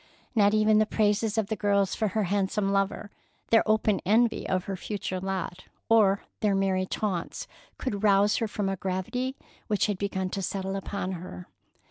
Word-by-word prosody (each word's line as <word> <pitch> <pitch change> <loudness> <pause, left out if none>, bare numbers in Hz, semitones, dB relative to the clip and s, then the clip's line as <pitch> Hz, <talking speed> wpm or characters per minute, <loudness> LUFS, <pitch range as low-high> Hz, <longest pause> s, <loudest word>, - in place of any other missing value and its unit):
Not 205 -2 +4
even 215 0 +4
the 215 - +3
praises 210 0 +1
of 220 - +2
the 220 +2 -2
girls 200 -1 +1
for 220 - 0
her 210 +2 0
handsome 195 +1 0
lover, 195 +1 -1 0.4
their 225 - +7
open 215 -2 +2
envy 225 +4 +2
of 185 -1 +1
her 195 - -4
future 190 0 -4
lot, 190 -1 -4 0.2
or 205 -3 +4 0.2
their 205 -2 +2
merry 190 -1 +1
taunts, 190 -5 -3 0.3
could 205 -7 -3
rouse 205 0 +4
her 225 - 0
from 205 -1 -2
a 195 - 0
gravity 195 +9 -2 0.3
which 210 -3 +1
had 205 -3 -2
begun 190 -2 -2
to 195 - -3
settle 195 +1 -3
upon 195 -1 -3
her. 170 - -7
200 Hz, 175 wpm, -27 LUFS, 190-215 Hz, 0.4 s, their